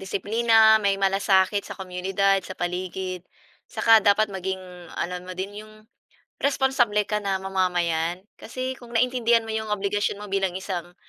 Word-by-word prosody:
disiplina, 220 +3 +3
may 200 -1 +1
malasakit 195 0 +2
sa - - -9
komunidad, 190 +1 0
sa 190 0 -9
paligid, 180 +1 -4 0.5
saka 225 -1 +5
dapat 205 0 +3
maging 190 0 -3 0.4
alam 180 +1 -4
mo 185 - -7
din 200 +2 -5
'yong, 215 0 -14 0.6
responsable 265 -6 +2
ka 210 +1 -2
na 195 -2 -2
mamamayan. 180 -2 -1 0.2
Kasi 255 +2 -5
kung 240 -1 -13
naintindihan 235 -1 +2
mo 225 - -7
'yong 220 -1 -1
obligasyon 205 0 -2
mo 210 - -9
bilang 195 -2 0
isang, 180 -2 -5
195 Hz, 145 wpm, -24 LUFS, 185-220 Hz, 0.6 s, saka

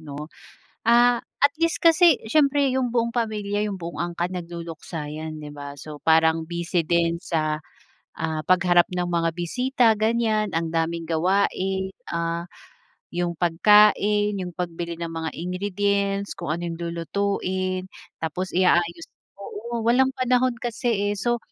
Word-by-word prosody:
'no? 150 -1 -7 0.6
Ah, 240 +1 +5 0.2
at 285 0 +6
least 330 - +2
kasi 335 +1 +6
siyempre 280 +1 +3
yung 255 -2 0
buong 235 -1 +1
pamilya 210 -3 -1
yung 200 -2 -4
buong 170 +1 -6
angkan 175 +1 -2
nagluluksa 170 -2 -6
yan, 155 0 -6
'di 150 -1 -8
ba? 145 0 -7
So, 150 +1 -9
parang 160 0 +4
busy 170 0 -1
din 170 0 +1
sa, 155 -2 -1 0.6
ah, 160 -1 -2
pagharap 175 -1 +4
ng 180 -1 -1
mga 165 -1 +1
bisita, 250 +8 +1
ganiyan, 220 -1 +1
ang 165 0 -1
daming 165 0 -1
gawain, 190 +2 0 0.2
ah, 170 0 -2 0.7
yung 175 0 -1
pagkain, 210 +3 +4
yung 180 -2 -5
pagbili 170 -1 -4
ng 170 -1 -4
mga 165 -1 -3
ingredients, 200 +2 -1
kung - - -6
ano 170 - -5
yung 165 -1 -5
lulutuin, 185 +2 -2 0.4
tapos 180 +4 -3
i-aayos, 175 -2 +2 0.3
oo, 230 +4 -5
walang 250 +4 +3
panahon 255 0 +2
kasi 225 -3 -1
eh. - - -1
So, 240 +4 0
180 Hz, 140 wpm, -24 LUFS, 170-215 Hz, 0.7 s, at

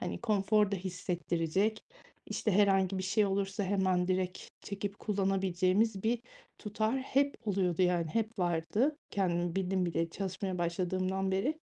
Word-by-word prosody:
hani, - - -4
konforda 210 -2 +2
hissettirecek, 180 +2 -1 0.5
işte, 215 - -1
herhangi 195 -1 +3
bir - - -2
şey 205 +3 +2
olursa 195 +1 -1
hemen 185 -2 +1
direkt 185 -1 -1
çekip 200 0 -5
kullanabileceğimiz 195 +1 +1
bir 230 +1 +1 0.4
tutar 215 +4 -1
hep 275 +2 +1
oluyordu, 185 -3 +1
yani, 175 -2 +2
hep 220 +6 -2
vardı 180 - +1
kendimi 175 -2 0
bildim 185 -1 0
bileli 165 0 -1
çalışmaya 190 -1 -3
başladığımdan 185 +2 -1
beri. 260 +12 0
190 Hz, 130 wpm, -32 LUFS, 180-205 Hz, 0.5 s, herhangi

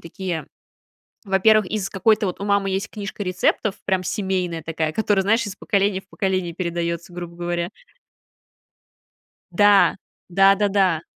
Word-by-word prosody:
такие 165 -2 -5 0.8
во-первых, 205 +2 +4
из 210 -3 -2
какой-то 210 +2 +2
вот 180 - -4
у - - -3
мамы 200 -1 +1
есть 195 +3 -2
книжка 205 -1 -6
рецептов 185 +2 0
прям 190 -2 0
семейная 185 -4 -2
такая, 160 -1 -2
которая, 205 -1 +1
знаешь, 225 +3 +2
из 200 - -5
поколения 200 -1 0
в 190 - -31
поколение 185 -5 -2
передается, 170 -1 -3
грубо 175 -1 -8
говоря. 175 0 -2 1.8
Да, 205 +2 +5 0.3
да-да-да. 195 -2 +3
190 Hz, 130 wpm, -22 LUFS, 175-205 Hz, 1.8 s, Да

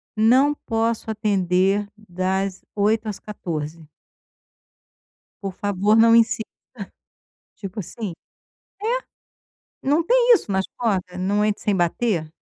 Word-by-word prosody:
não 255 +7 +4
posso 225 -3 -2
atender 195 -1 +1
das 190 -1 -2
8h 215 +2 +1
às 210 -2 -4
14h. 160 -6 -6 1.6
Por 195 -2 -3
favor 205 +1 +1
não 230 +1 +6
insista, 225 -1 +3 1.1
tipo 200 +1 -8
assim, 205 +1 -6 1.7
é, - - -4
não 300 +4 +3
tem - - +5
isso 345 - -2
nas 190 0 0
portas, 185 -6 -1
não 205 +3 +1
entre 210 -1 -1
sem 205 - +1
bater, 175 -1 0
205 Hz, 110 wpm, -22 LUFS, 185-225 Hz, 1.7 s, não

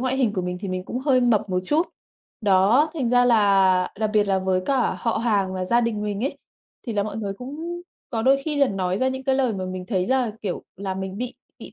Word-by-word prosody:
ngoại 260 +1 0
hình 250 -6 +2
của 190 -3 -2
mình 180 0 -3
thì 200 - -5
mình 185 0 -3
cũng 245 - -4
hơi 260 -1 +2
mập 235 -5 +2
một 180 0 +1
chút. 300 - +2 0.6
Đó, 210 +9 +4
thành 270 -7 -1
ra 245 +1 +4
là 195 -5 +4
đặc 215 -1 0
biệt 210 -1 +4
là 190 -1 +2
với 185 0 0
cả 270 -3 +1
họ 230 -2 0
hàng 200 -5 +1
và 185 - -2
gia 235 +6 +3
đình 230 -3 -1
mình 210 +2 -2
ấy, 280 +1 -3 0.5
thì 235 - -2
là 205 -1 +1
mọi 210 0 -5
người 205 -3 -3
cũng 305 - -6 0.3
có 225 -4 -1
đôi 270 +3 +5
khi 305 -2 -2
là 280 -1 +4
nói 185 -1 -1
ra 260 - +2
những 265 0 -4
cái 265 - +2
lời 260 -3 +1
mà 190 -1 -3
mình 185 0 -6
thấy 185 -4 0
là, 255 -2 +1
kiểu, 195 -4 -3
là 190 0 -4
mình 190 0 -5
bị 250 +1 -4 0.2
bị - - -11
215 Hz, 255 wpm, -23 LUFS, 190-255 Hz, 0.6 s, đôi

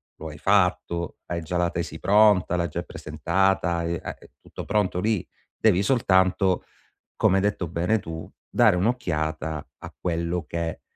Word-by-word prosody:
lo 80 - -8
hai 75 - -10
fatto, 90 -3 +1
hai 85 -1 -3
già 85 +2 -3
la 85 0 +2
tesi 85 -1 -4
pronta, 105 -3 +4
l'hai 85 -1 0
già 85 +3 -3
presentata, 95 -3 0
e 85 0 -2
a - - -5
è - - -18
tutto - - -9
pronto 100 -4 0
lì. 105 -2 0 0.3
Devi 100 -4 +3
soltanto, 95 -5 +2 0.5
come 95 - +3
hai - - +2
detto 100 -4 0
bene 90 +7 0
tu, 80 -2 -7 0.2
dare 110 -6 +4
un'occhiata, 80 - -1
a - - -10
quello 85 0 -2
che, 85 -1 -4
90 Hz, 160 wpm, -25 LUFS, 85-100 Hz, 0.5 s, pronta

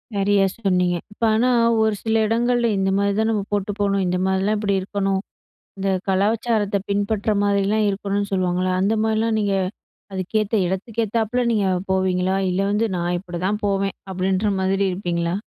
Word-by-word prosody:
சரியா 200 0 +3 0.2
சொன்னீங்க. 180 -4 +1 0.2
இப்ப 230 - -8
ஆனா 240 +3 +2 0.4
ஒரு 220 -1 +1
சில 225 0 +1
இடங்கள்ல 240 +1 +1
இந்த 195 0 +1
மாரி 200 0 +1
தான் 220 +1 +2
நம்ம 210 -2 0
போட்டு 205 0 0
போணும். 200 -1 +1
இந்த 180 0 0
மாரிலாம் 190 +3 +1
இப்புடி 205 -1 0
இருக்கணும். 195 0 -1 0.6
இந்த 195 - -1 0.2
கலாச்சாரத்த 205 +1 +1
பின்பற்ற 205 +1 0
மாரிலாம் 205 +1 +2
இருக்கணுன்னு 200 0 -2
சொல்லுவாங்கல்ல? 185 0 0
அந்த 200 +3 +2
மாரிலாம் 220 0 +1
நீங்க 200 -1 0 0.6
அதுக்கேத்த 210 +3 -1
இடத்துக்கேத்தாப்புல 225 +4 -1
நீங்க 205 -3 +1 0.2
போவீங்களா? 185 0 +1
இல்ல 180 +2 0
வந்து 210 +2 +1
"நான் 175 0 -1
இப்படிதான் 185 +3 -3
போவேன்" 195 0 -1 0.2
அப்படின்ற 190 +2 0
மாரி 190 +1 +1
இருப்பீங்களா? 175 -2 -2
200 Hz, 145 wpm, -22 LUFS, 190-215 Hz, 0.6 s, சரியா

